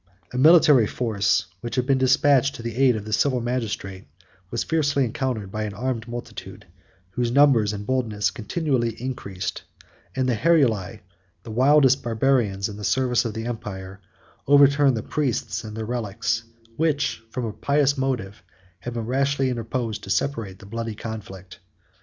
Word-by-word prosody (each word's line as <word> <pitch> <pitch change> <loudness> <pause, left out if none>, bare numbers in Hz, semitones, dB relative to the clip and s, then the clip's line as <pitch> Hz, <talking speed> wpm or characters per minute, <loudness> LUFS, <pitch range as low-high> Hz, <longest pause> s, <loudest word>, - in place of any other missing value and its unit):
A - - -3
military 150 -6 +6
force, 100 -7 0
which 120 +4 -5
had 125 -1 0
been 135 0 +2
despatched 135 +1 +3
to 115 - -9
the 115 -1 -4
aid 130 -2 +4
of 105 -1 -5
the 110 - -5
civil 130 +3 +2
magistrate, 115 -6 -4 0.4
was 120 - -2
fiercely 145 -4 +1
encountered 115 -4 -3
by 110 - -4
an 105 -2 -6
armed 120 0 -3
multitude, 120 0 -8 0.5
whose 120 +4 -1
numbers 125 -5 +4
and 105 -1 -6
boldness 115 -5 0
continually 120 -2 -2
increased; 100 -7 -5 0.5
and 130 -1 0
the 125 - +2
Heruli, 115 - +2 0.4
the 115 - -8
wildest 135 +2 +4
Barbarians 115 -4 +1
in 105 -2 -8
the 105 - -8
service 125 +5 +1
of 110 -3 -4
the 110 0 -4
empire, 100 -4 -6 0.5
overturned 140 -2 +5
the 110 - -4
priests 130 -5 -2
and 110 0 -8
their 110 - -3
relics, 115 0 -2 0.3
which, 150 -6 0
from 125 +1 -4
a 110 - -4
pious 140 +2 +1
motive, 125 -7 -3 0.4
had 120 0 -6
been 115 -2 -3
rashly 135 +1 +1
interposed 115 -2 -3
to - - -10
separate 105 -4 -1
the - - -14
bloody 115 +1 -5
conflict. 100 -4 -8
120 Hz, 160 wpm, -24 LUFS, 105-135 Hz, 0.5 s, military